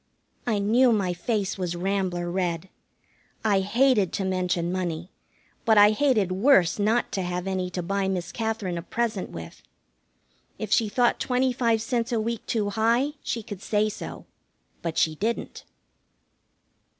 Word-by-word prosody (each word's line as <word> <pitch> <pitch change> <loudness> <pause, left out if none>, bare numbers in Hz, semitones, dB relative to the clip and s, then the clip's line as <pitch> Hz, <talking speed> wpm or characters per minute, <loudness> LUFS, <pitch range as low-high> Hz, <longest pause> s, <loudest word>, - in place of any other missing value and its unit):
I 220 -3 +2
knew 235 +5 +4
my 195 -5 +1
face 200 +2 -2
was 175 -2 -2
rambler 180 -1 -1
red. 180 -1 -2 0.8
I 205 -3 +4
hated 210 0 +3
to 195 - -1
mention 180 -2 0
money, 175 -1 -3 0.5
but 220 -2 +4
I 205 0 +8
hated 215 -6 +2
worse 190 -2 +4
not 220 +4 +1
to 195 - -1
have 180 0 -3
any 190 -1 -2
to 180 0 -4
buy 195 +2 -1
Miss 180 -3 -2
Katherine 220 -6 -2
a - - -5
present 220 +1 -2
with. 80 -1 -9 1.0
If 215 - -5
she 225 -3 +3
thought 240 +3 +2
twenty 255 0 +1
five 230 -3 +1
cents 235 0 -1
a 230 - +1
week 230 0 -2
too 210 -3 0
high 235 +6 +2
she 230 - -3
could 200 -2 -8
say 210 +1 +1
so. 210 - -8 0.6
But 165 -1 -3
she 160 - +3
didn't. 220 +9 -3
200 Hz, 155 wpm, -26 LUFS, 180-230 Hz, 1.0 s, I